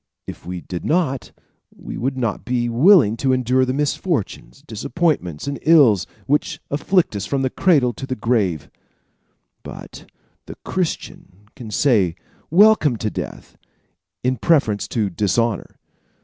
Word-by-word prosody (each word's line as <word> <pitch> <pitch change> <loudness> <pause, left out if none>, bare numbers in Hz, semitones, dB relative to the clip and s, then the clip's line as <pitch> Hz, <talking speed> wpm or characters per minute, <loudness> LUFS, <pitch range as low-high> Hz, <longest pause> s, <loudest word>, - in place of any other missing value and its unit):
If - - -10
we 90 -1 -5
did 90 0 -6
not, 155 -6 -1 0.5
we - - -8
would 130 +2 -2
not 115 -5 -2
be 120 -1 -1
willing 130 - +5
to 130 +2 +1
endure 130 +1 +2
the 130 - -2
misfortunes, 145 - -3
disappointments 135 - -2
and 140 0 -4
ills 140 - +5 0.2
which 145 +2 0
afflict 160 - +1
us 100 0 -4
from 135 -1 -1
the 130 - 0
cradle 140 -10 +2
to 135 - -8
the 130 - -3
grave; 100 - -1 0.9
but - - -11 0.4
the - - -8
Christian 155 - -4
can 120 -5 -9
say 105 - +2 0.3
welcome 175 - +5
to 110 -1 -3
death - - -8 0.6
in 130 +1 0
preference 115 -8 +1
to 105 -4 -1
dishonor. 105 +3 -1
125 Hz, 135 wpm, -20 LUFS, 105-145 Hz, 0.9 s, willing